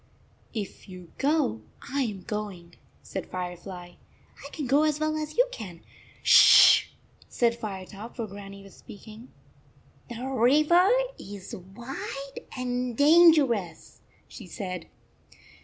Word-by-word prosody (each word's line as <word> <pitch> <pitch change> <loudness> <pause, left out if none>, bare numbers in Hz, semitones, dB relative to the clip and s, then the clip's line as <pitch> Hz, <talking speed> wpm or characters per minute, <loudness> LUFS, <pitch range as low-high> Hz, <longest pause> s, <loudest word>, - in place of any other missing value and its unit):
"If 205 -2 -7
you 180 -3 -12
go, 285 - +1 0.2
I 275 -1 -2
m 200 -5 -6
going," 195 -5 -6 0.3
said - - -6
Firefly. 180 0 -7 0.3
" - - -21
I 280 - -9
can 295 -1 -6
go 275 +4 +3
as 305 -1 +1
well 310 0 -1
as 310 +3 -5
you - - +4
can." 180 - -9 0.2
" - - -27
Sh - - +4
sh - - +9
sh - - +7 0.4
said 235 -1 +1
Firetop, 210 0 -8
for 230 - -4
Grannie 200 -1 -11
was 195 - -15
speaking. 220 +4 -13 0.8
"The 240 +1 -6
river 300 - +3 0.3
is 200 -1 -9
wide 245 +8 -8
and 250 -1 -3
dangerous," 285 - +3 0.3
she 215 - -12
said. 180 -3 -6
225 Hz, 135 wpm, -26 LUFS, 190-275 Hz, 0.8 s, sh